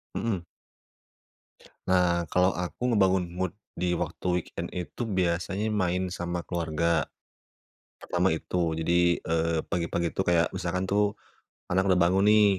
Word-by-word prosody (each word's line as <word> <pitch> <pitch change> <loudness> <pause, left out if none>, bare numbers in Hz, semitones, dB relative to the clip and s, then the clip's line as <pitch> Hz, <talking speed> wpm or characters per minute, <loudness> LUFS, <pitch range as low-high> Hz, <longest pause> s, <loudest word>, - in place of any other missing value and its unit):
Mhm. 95 -7 -2 1.4
Nah, 90 -2 +3
kalau 90 +1 +4
aku 90 +5 -5
ngebangun 95 -5 +3
mood 95 -2 -1 0.2
di 90 0 0
waktu 85 0 -4 0.2
weekend - - -6
itu 90 +6 -5
biasanya 95 +1 0
main 95 -3 0
sama 85 -1 -3
keluarga. 85 -2 0 1.0
Pertama - - +1
itu. - - -3 0.2
Jadi, 85 +1 +3
eee, 80 0 0
pagi-pagi 85 0 -1
itu 95 - +2
kayak 85 -2 +4
misalkan 95 +1 -2
tuh, 105 +1 +2 0.6
anak 95 +2 +2
udah 90 - +4
bangun 95 +3 +3
nih, 105 -1 +6
90 Hz, 130 wpm, -27 LUFS, 85-95 Hz, 1.4 s, nih